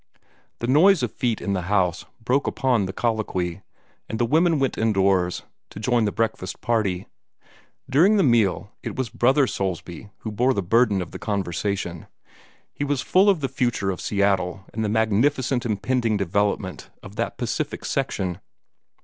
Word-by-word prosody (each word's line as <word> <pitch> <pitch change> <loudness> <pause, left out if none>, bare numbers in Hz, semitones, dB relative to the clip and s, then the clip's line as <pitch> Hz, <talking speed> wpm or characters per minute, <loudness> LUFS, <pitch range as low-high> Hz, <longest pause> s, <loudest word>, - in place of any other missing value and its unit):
The - - -1
noise 160 +8 +5
of - - -1
feet 120 -4 -1
in 100 - -2
the 95 - -1
house 90 -4 +1 0.2
broke 130 +4 +1
upon 120 -7 +1
the - - -4
colloquy, 100 -5 -2 0.5
and 110 - -3
the 120 - +2
women 160 +5 +3
went 135 -2 0
indoors, 95 -4 +1 0.3
to - - -9
join 120 +1 +2
the 105 - 0
breakfast 110 -4 -2
party. 100 -6 0 0.8
During 175 +11 +4
the 195 - +4
meal, 110 - +2
it - - -5
was 130 -3 -2
Brother 130 +4 +3
Soulsby 95 -3 -4
who 110 - -5
bore 125 +5 +2
the 100 - -1
burden 105 0 +3
of 85 - -12
the - - -8
conversation. 95 -3 -3 0.7
He - - -4
was 145 -3 -1
full 195 +3 +4
of 185 -6 +2
the 135 - 0
future 120 -7 -1
of 90 - -6
Seattle 95 -2 0
and 110 - -2
the 105 - 0
magnificent 120 +4 +1
impending 115 +1 0
development 100 0 -1
of - - -11
that - - -2
Pacific - - -3
section. 90 -2 -2
110 Hz, 165 wpm, -23 LUFS, 95-130 Hz, 0.8 s, noise